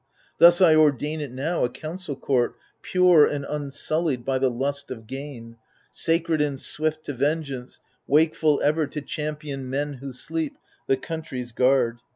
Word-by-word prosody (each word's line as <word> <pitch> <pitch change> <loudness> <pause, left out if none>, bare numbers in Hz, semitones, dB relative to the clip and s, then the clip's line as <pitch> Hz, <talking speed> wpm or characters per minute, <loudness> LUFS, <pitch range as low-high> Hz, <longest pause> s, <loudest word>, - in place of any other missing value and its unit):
Thus 175 +2 +8
I 170 -4 +7
ordain 155 0 +2
it 145 - -4
now, 140 +8 -2
a 125 - +1
council 155 +3 -6
court 130 -2 0 0.3
Pure 180 -4 +5
and 145 -1 -3
unsullied 145 -1 -1
by 135 -1 0
the 130 0 +2
lust 140 +3 -3
of 115 -4 -8
gain, 130 -3 -8 0.3
Sacred 165 -1 0
and 145 -2 -1
swift 155 +2 0
to 145 - -5
vengeance, 140 -2 -2 0.3
wakeful 155 0 +3
ever 155 +1 +2
To 150 +2 -6
champion 150 -3 -5
men 145 +2 -2
who 135 -1 -6
sleep, 155 +4 -4 0.3
the 135 - +3
country's 140 -5 -6
guard. 125 -1 +2
145 Hz, 155 wpm, -24 LUFS, 130-155 Hz, 0.3 s, Thus